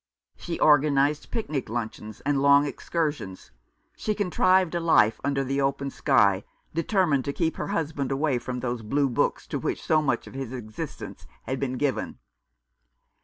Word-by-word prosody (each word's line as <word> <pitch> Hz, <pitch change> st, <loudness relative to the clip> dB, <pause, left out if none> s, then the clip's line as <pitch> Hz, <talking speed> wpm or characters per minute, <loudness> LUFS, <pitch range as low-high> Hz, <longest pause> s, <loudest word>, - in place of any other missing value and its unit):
She 170 Hz, -, -5 dB
organized 145 Hz, 0 st, +3 dB
picnic 155 Hz, -, -3 dB
luncheons 110 Hz, -2 st, -5 dB
and 140 Hz, -1 st, 0 dB
long 140 Hz, +1 st, +6 dB
excursions; 145 Hz, -, -3 dB, 0.4 s
she 215 Hz, -, -2 dB
contrived 185 Hz, -2 st, +2 dB
a 170 Hz, -, 0 dB
life 115 Hz, -10 st, +3 dB
under 140 Hz, 0 st, 0 dB
the 135 Hz, +1 st, -1 dB
open 140 Hz, 0 st, -1 dB
sky, 100 Hz, -10 st, +3 dB, 0.3 s
determined 165 Hz, -4 st, +1 dB
to 140 Hz, -, -2 dB
keep 165 Hz, 0 st, -1 dB
her -, -, -3 dB
husband 155 Hz, -8 st, -2 dB
away 135 Hz, -2 st, +1 dB
from 125 Hz, 0 st, -5 dB
those 120 Hz, -1 st, -2 dB
blue 140 Hz, +6 st, +1 dB
books 120 Hz, -, 0 dB
to -, -, -4 dB
which -, -, -3 dB
so 155 Hz, -1 st, +3 dB
much 135 Hz, -5 st, 0 dB
of -, -, -12 dB
his 135 Hz, -2 st, -5 dB
existence 110 Hz, -4 st, -7 dB, 0.2 s
had 130 Hz, 0 st, -3 dB
been 135 Hz, -2 st, -2 dB
given. 135 Hz, +1 st, -2 dB
140 Hz, 160 wpm, -26 LUFS, 125-155 Hz, 0.4 s, long